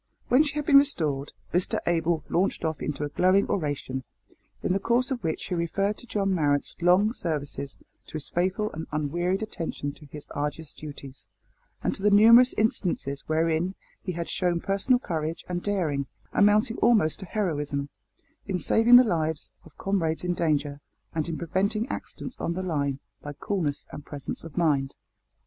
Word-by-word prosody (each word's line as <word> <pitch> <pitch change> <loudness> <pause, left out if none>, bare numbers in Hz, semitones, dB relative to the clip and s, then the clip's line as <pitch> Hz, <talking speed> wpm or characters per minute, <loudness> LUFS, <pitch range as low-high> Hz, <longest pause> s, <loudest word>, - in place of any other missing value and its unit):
When 255 +4 +6
she 295 -2 0
had 295 -1 -2
been 280 -1 +7
restored, 150 - 0 0.2
Mr 180 +1 +1
Abel 165 -2 +1
launched 180 -1 0
off 160 -1 -2
into 150 0 -3
a 145 - -2
glowing 185 +6 +3
oration, 145 -6 -2 0.6
in - - +1
the 195 - +1
course 240 +5 +1
of 250 -2 -2
which 160 -1 -2
he - - -1
referred 195 +5 0
to 245 - -12
John 195 -3 0
Marrot's 145 -5 +1
long 185 +6 +4
services, 145 - -4 0.3
to - - -14
his 155 -2 -4
faithful 190 +4 0
and 160 +1 -6
unwearied 175 +7 0
attention 165 -8 -4
to 150 +1 -15
his 150 +1 -10
arduous 150 +1 -4
duties, 140 -3 -9 0.6
and - - +1
to - - -8
the 210 - +4
numerous 230 +5 +7
instances 175 -10 0
wherein 165 +3 +1 0.3
he 185 - -4
had 170 0 -4
shown 175 -2 0
personal 195 +8 +2
courage 165 -7 -3
and 175 -1 -2
daring, 160 -10 -1 0.3
amounting 215 +3 +4
almost 210 -10 +3
to 190 - -7
heroism, 145 -8 -2 0.6
in 190 -2 0
saving 225 +6 +5
the 250 - +10
lives 160 -7 -1
of - - -17
comrades 170 -5 -1
in 180 0 0
danger, 145 -4 0 0.3
and 160 0 -1
in 165 - -3
preventing 195 +7 0
accidents 250 - -6
on 170 - -1
the 185 +2 -3
line 140 -6 -1 0.2
by 145 - -6
coolness 150 -2 -2
and 145 - -8
presence 145 -2 -6
of 165 0 -10
mind. 145 -6 +1
170 Hz, 170 wpm, -27 LUFS, 150-200 Hz, 0.6 s, the